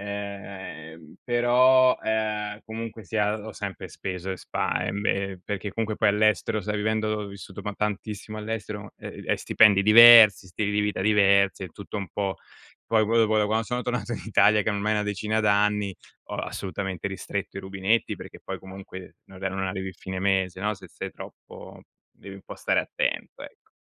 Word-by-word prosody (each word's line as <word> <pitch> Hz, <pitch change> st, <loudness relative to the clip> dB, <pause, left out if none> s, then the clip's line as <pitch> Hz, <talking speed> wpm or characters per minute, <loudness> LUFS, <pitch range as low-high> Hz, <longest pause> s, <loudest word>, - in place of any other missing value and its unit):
Ehm, 100 Hz, -6 st, -8 dB
però, 125 Hz, +1 st, +4 dB
ehm, 105 Hz, -1 st, -2 dB
comunque 115 Hz, 0 st, -7 dB
sia 105 Hz, 0 st, 0 dB
ho 110 Hz, -, -6 dB
sempre 100 Hz, -2 st, -6 dB
speso 90 Hz, +1 st, -5 dB
e 95 Hz, -, -3 dB
spa -, -, -2 dB
ehm, 100 Hz, +1 st, -3 dB
e 95 Hz, -1 st, -1 dB
perché 100 Hz, -1 st, -4 dB
comunque 110 Hz, -1 st, -2 dB
poi 110 Hz, -, +3 dB
all'estero, 110 Hz, 0 st, +1 dB
sai 105 Hz, +2 st, -3 dB
vivendo 110 Hz, +1 st, 0 dB
ho 105 Hz, -1 st, -2 dB
vissuto 100 Hz, 0 st, -10 dB
ma 105 Hz, -, -4 dB
tantissimo 105 Hz, +1 st, -4 dB
all'estero, 105 Hz, -1 st, -5 dB
e -, -, -9 dB
e -, -, +1 dB
stipendi 105 Hz, -3 st, +4 dB
diversi, 110 Hz, -2 st, +9 dB
stili 100 Hz, +4 st, -2 dB
di 105 Hz, -, 0 dB
vita 105 Hz, -2 st, -1 dB
diversi, 100 Hz, -1 st, +3 dB
è 90 Hz, -, -7 dB
tutto 100 Hz, +4 st, -8 dB
un 100 Hz, -2 st, -3 dB
po' 100 Hz, -2 st, -2 dB, 0.5 s
poi 110 Hz, -1 st, +3 dB
poi 115 Hz, +2 st, 0 dB
dopo 110 Hz, -1 st, +3 dB
da 105 Hz, -, +2 dB
quando 110 Hz, +2 st, 0 dB
sono 125 Hz, +2 st, -3 dB
tornato 120 Hz, -2 st, -3 dB
in -, -, -5 dB
Italia, 105 Hz, -1 st, +4 dB
che 110 Hz, -, 0 dB
ormai 105 Hz, +1 st, -1 dB
è -, -, +2 dB
na 105 Hz, -, 0 dB
decina 105 Hz, +2 st, -1 dB
d'anni, 105 Hz, -1 st, +2 dB, 0.4 s
ho -, -, -4 dB
assolutamente 95 Hz, -1 st, -4 dB
ristretto 100 Hz, 0 st, -5 dB
i -, -, -5 dB
rubinetti 95 Hz, +4 st, 0 dB
perché -, -, -11 dB
poi -, -, -6 dB
comunque 95 Hz, -1 st, -10 dB
non 95 Hz, -, -14 dB
re 95 Hz, -, -1 dB
non 95 Hz, 0 st, -3 dB
arrivi 95 Hz, 0 st, -4 dB
fine 95 Hz, +1 st, -6 dB
mese, 95 Hz, -1 st, 0 dB
no, 105 Hz, +2 st, 0 dB
se -, -, -13 dB
sei -, -, -7 dB
troppo -, -, -12 dB, 0.3 s
devi 100 Hz, 0 st, -12 dB
un 95 Hz, -, -14 dB
po' -, -, -8 dB
stare -, -, 0 dB
attento, -, -, -3 dB
ecco. -, -, -14 dB
105 Hz, 185 wpm, -25 LUFS, 95-110 Hz, 0.5 s, diversi